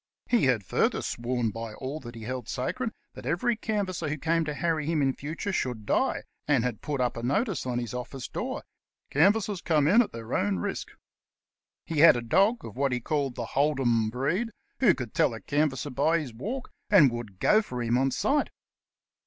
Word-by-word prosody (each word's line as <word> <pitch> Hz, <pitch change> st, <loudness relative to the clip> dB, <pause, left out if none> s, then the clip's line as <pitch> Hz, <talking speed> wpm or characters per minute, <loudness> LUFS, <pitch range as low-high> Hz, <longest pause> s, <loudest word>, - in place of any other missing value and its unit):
He 240 Hz, -, +3 dB
had 125 Hz, -5 st, +2 dB
further -, -, +1 dB
sworn 120 Hz, -1 st, -1 dB
by 115 Hz, 0 st, -6 dB
all 140 Hz, +4 st, -5 dB
he 115 Hz, -2 st, -10 dB
held 125 Hz, 0 st, -5 dB
sacred 230 Hz, -, -2 dB, 0.2 s
that 130 Hz, -1 st, -9 dB
every 175 Hz, -, +1 dB
canvasser 200 Hz, -7 st, -2 dB
who 155 Hz, -, -2 dB
came 165 Hz, +2 st, +1 dB
to 150 Hz, -, -2 dB
harry 160 Hz, -2 st, 0 dB
him 165 Hz, -1 st, +1 dB
in 135 Hz, -2 st, +2 dB
future 155 Hz, +9 st, -4 dB
should 125 Hz, -, -2 dB
die, -, -, +1 dB, 0.2 s
and 140 Hz, -6 st, +3 dB
had 125 Hz, -4 st, -2 dB
put 145 Hz, -3 st, -3 dB
up 125 Hz, -1 st, +1 dB
a -, -, -3 dB
notice 155 Hz, -, 0 dB
on 125 Hz, -1 st, -1 dB
his 120 Hz, -2 st, -3 dB
office 125 Hz, +1 st, -5 dB
door, -, -, -4 dB, 0.5 s
"Canvassers 200 Hz, +4 st, +3 dB
come 150 Hz, -3 st, +2 dB
in 210 Hz, +9 st, +6 dB
at 235 Hz, -, -2 dB
their 115 Hz, 0 st, -7 dB
own 100 Hz, -1 st, +1 dB
risk." 85 Hz, -, -3 dB, 1.0 s
He 160 Hz, -3 st, -2 dB
had 165 Hz, -2 st, +9 dB
a -, -, -2 dB
dog 200 Hz, -, +2 dB
of -, -, -9 dB
what 135 Hz, +1 st, +1 dB
he 125 Hz, -, 0 dB
called 140 Hz, 0 st, -1 dB
the 120 Hz, -, -3 dB
Hold 145 Hz, +3 st, +1 dB
'em 115 Hz, -4 st, +2 dB
breed, 145 Hz, -, -1 dB, 0.3 s
who 220 Hz, -9 st, +5 dB
could 120 Hz, -5 st, -6 dB
tell 115 Hz, -, +2 dB
a -, -, -7 dB
canvasser 145 Hz, +3 st, 0 dB
by 150 Hz, +6 st, +2 dB
his 145 Hz, -8 st, -5 dB
walk, 230 Hz, -, -5 dB, 0.2 s
and 165 Hz, -11 st, +7 dB
would 120 Hz, -5 st, -6 dB
go 215 Hz, -, +5 dB
for 125 Hz, -, -5 dB
him 120 Hz, +1 st, +1 dB
on 135 Hz, +2 st, +3 dB
sight. 285 Hz, -, +1 dB
140 Hz, 200 wpm, -28 LUFS, 120-170 Hz, 1.0 s, had